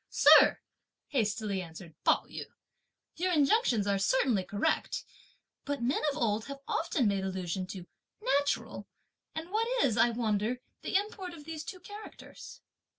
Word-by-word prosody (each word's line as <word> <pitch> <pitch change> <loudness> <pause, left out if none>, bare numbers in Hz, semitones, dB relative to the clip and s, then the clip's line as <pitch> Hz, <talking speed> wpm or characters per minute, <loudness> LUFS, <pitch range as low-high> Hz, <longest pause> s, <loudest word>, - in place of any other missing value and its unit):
"Sir," - - +7 0.5
hastily 215 -6 0
answered 165 -1 -10
Pao - - +3
yü, - - -7 0.7
"your 365 +2 0
injunctions 290 - +3
are 200 -1 +1
certainly 220 -1 +2
correct; 200 +3 -1 0.6
but 285 -4 -3
men 255 +4 +1
of - - -6
old 220 -2 0
have 280 0 -7
often 315 -7 +1
made 200 -1 0
allusion 185 -1 -3
to 185 -2 -7 0.3
'natural;' 285 - 0 0.5
and 320 +3 -5
what 445 +2 +1 0.2
is, 230 - +2
I 240 - +5
wonder, 225 0 0 0.2
the - - -4
import 385 -3 -1
of 300 -3 -12
these 315 -1 -6
two 385 -5 -8
characters?" 415 +3 -11
245 Hz, 145 wpm, -31 LUFS, 200-325 Hz, 0.7 s, Sir